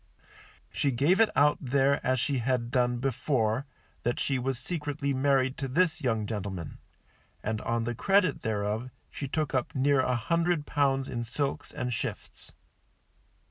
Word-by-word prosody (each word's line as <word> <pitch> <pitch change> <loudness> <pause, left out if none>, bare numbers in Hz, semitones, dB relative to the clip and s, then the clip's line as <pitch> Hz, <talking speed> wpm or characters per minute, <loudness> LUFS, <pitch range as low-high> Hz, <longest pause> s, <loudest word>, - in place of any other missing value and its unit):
She 140 - 0
gave 140 - +3
it 225 - +5
out 150 +1 +4
there 140 +1 +2
as 130 0 +1
she 135 +2 0
had 120 -1 -1
done 125 -1 +2
before, 130 -1 0 0.3
that 120 +1 -1
she 135 -2 0
was 130 0 -1
secretly 145 0 -2
married 135 0 +2
to 135 - -2
this 160 +5 +1
young 115 -5 0
gentleman; 100 -6 -5 0.6
and 110 0 -2
on 115 0 -1
the 120 +1 -2
credit 195 - +2
thereof 110 +3 -2 0.2
she 140 - -5
took 155 +2 -1
up 130 +1 -1
near 140 +1 +3
a 125 -1 +2
hundred 170 +5 +1
pounds 135 -2 +1
in 120 -1 -3
silks 140 +4 -3
and 125 -1 -3
shifts. - - -6
130 Hz, 155 wpm, -29 LUFS, 120-145 Hz, 0.6 s, it